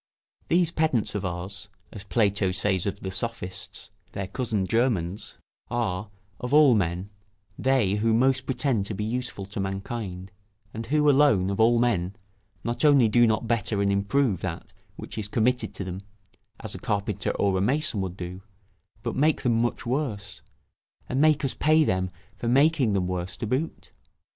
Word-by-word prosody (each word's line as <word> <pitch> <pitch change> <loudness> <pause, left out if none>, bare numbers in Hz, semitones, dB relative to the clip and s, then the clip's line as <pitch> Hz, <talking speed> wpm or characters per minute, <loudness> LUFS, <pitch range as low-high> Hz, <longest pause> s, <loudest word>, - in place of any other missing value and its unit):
] - - -42
These 170 -1 +3
pedants 155 -9 +1
of 105 - -3
ours, 95 +3 -5 0.2
as 105 - -8
Plato 100 -1 +1
says 95 0 0
of 100 - -4
the 95 - -4
Sophists, 100 -1 -4 0.2
their 100 -1 -3
cousin 105 -1 -1
germans, 105 -4 0 0.3
are, 105 -4 -2 0.3
of 125 +3 0
all 150 -4 +7
men, 95 -1 -1 0.4
they 125 -7 +2
who 115 +2 +2
most 130 +3 +2
pretend 130 -6 0
to 105 - -4
be 105 - -3
useful 120 -3 -3
to 100 +1 -6
mankind, 95 -1 -4 0.4
and 115 +1 -5
who 150 +3 +2
alone, 135 -10 +4
of 100 - -3
all 115 +2 +5
men, 105 -6 +1 0.5
not 120 +5 -2
only 140 -6 +6
do 120 +2 +5
not 110 +1 0
better 110 -3 0
and 100 0 +2
improve 100 +1 +1
that 90 -3 -5 0.2
which - - -7
is 105 - -2
committed 120 +4 +1
to - - -4
them, 95 0 -5 0.6
as - - -7
a - - -6
carpenter 100 -1 -2
or 100 -1 +2
a 95 - +1
mason 130 -1 +1
would 95 -1 -4
do, 90 +1 -6 0.6
but 115 - -2
make 150 +3 +2
them 115 -3 +2
much 120 - -1
worse, 120 -7 -3 0.7
and 130 +3 0
make 155 -2 +4
us 135 - -1
pay 155 +1 +4
them 95 -8 0 0.3
for 115 - -4
making 135 -2 +4
them 95 -2 +1
worse, 90 0 -3
to 115 - -3
boot. 130 +9 -3
110 Hz, 170 wpm, -26 LUFS, 95-125 Hz, 0.7 s, all